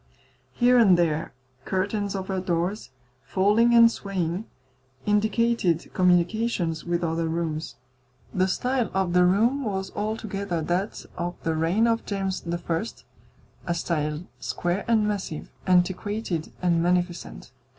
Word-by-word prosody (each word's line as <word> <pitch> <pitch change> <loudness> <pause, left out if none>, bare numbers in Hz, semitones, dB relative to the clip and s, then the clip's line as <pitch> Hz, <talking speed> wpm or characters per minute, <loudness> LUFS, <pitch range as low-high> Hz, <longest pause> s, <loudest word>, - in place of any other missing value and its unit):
Here 245 0 +4
and 195 -6 +6
there 160 -2 0 0.3
curtains 200 +3 -1
over 190 0 -2
doors, 180 -1 -2 0.3
falling 210 - +3
and 230 0 +8
swaying, 190 -2 -3 0.6
indicated 210 -4 +1
communications 180 -1 +1
with 175 0 -1
other 165 0 0
rooms. 160 -1 -3 0.6
The 185 0 +2
style 250 +4 0
of 190 -2 +1
the 180 0 +5
room 230 +10 +3
was 190 -4 -3
altogether 200 -5 -3
that 180 +6 -2
of 175 +1 -2
the 165 - 0
reign 165 +8 +2
of 230 0 +1
James 195 -2 -2
I. 170 +2 -1 0.8
a 170 - 0
style 150 -2 -2 0.2
square 175 +3 -2
and 220 -2 +3
massive, 195 -7 -4 0.2
antiquated 185 0 0
and 170 -2 +3
magnificent. 175 -3 -1
185 Hz, 120 wpm, -25 LUFS, 170-210 Hz, 0.8 s, and